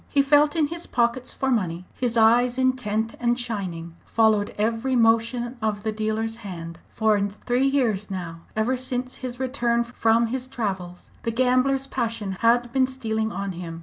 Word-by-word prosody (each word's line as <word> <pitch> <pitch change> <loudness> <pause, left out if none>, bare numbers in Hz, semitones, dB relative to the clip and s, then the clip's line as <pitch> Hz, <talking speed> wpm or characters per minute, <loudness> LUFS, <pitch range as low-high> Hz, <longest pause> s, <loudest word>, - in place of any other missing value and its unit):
He 280 -1 +3
felt 290 +2 +4
in 320 -2 +3
his 340 +1 -6
pockets 240 +1 0
for 265 0 -1
money; 180 -6 -1
his 240 -2 -1
eyes, 240 +3 +4
intent 230 -4 0
and 240 0 +1
shining, 185 -8 -4
followed 220 -2 +2
every 225 +5 0
motion 235 +1 +2
of 210 -2 -1
the 220 - 0
dealer's 220 +1 -2
hand. 170 -6 -8
For 220 -2 +2 0.3
three 250 +2 +2
years 230 -8 +1
now, 175 -3 -5 0.2
ever 220 +4 +1
since 255 0 -3
his 250 -1 -6
return 240 -3 +1
from 230 -1 +2
his 260 -1 -2
travels, 190 -8 -5
the 230 - -2
gambler's 255 +3 +2
passion 230 -6 -2
had 240 +1 +3
been 260 0 +3
stealing 220 -4 -2
on 200 -1 -3
him. 170 -2 -7
230 Hz, 165 wpm, -24 LUFS, 215-255 Hz, 0.3 s, felt